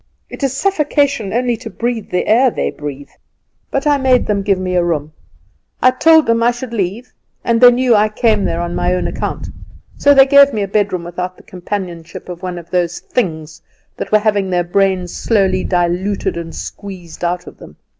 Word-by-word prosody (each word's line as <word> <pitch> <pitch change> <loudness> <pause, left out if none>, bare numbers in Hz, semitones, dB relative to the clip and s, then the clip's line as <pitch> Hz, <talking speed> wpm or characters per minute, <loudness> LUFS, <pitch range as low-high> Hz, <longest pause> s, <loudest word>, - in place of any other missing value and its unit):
It - - -9
is 270 -1 -1
suffocation 290 - 0
only 245 +1 0
to 235 -1 -8
breathe 235 -2 -3
the 180 - -1
air 250 +4 +4
they - - -2
breathe; 145 -1 -8 0.6
but 275 +1 -2
I 290 -1 +3
made 260 -2 +3
them 205 -1 0
give 195 -1 +1
me 185 -1 -2
room. 155 -4 -1 0.7
I 255 - +5
told 320 +4 +5
them 230 0 +1
I 235 - +4
should 240 0 -5
leave, 205 +3 -3 0.3
and 230 0 +1
they 245 - +10
knew 245 0 +2
I 215 0 +3
came 215 -1 +1
there 170 - -1
on 175 0 -3
my 180 - 0
own 180 - -2
account; - - -4 0.5
so 285 0 +5
they 270 -1 +8
gave 280 0 +6
me 210 - 0
a - - -3
bedroom 200 -3 0
without 180 +1 -5
the - - -17
companionship 180 -3 -6
of 175 -1 -7
one 180 -2 -5
of 170 -1 -11
those 175 -1 0
things 160 -9 -3 0.4
that - - -5
were 215 - +6
having 205 -2 0
their 180 -1 +1
brains 185 0 0
slowly 190 -4 +1
diluted 180 +3 -1
and 165 -1 -6
squeezed 180 -5 -9
out 175 +1 -1
of - - -13
them. - - -13
200 Hz, 195 wpm, -16 LUFS, 175-240 Hz, 0.7 s, they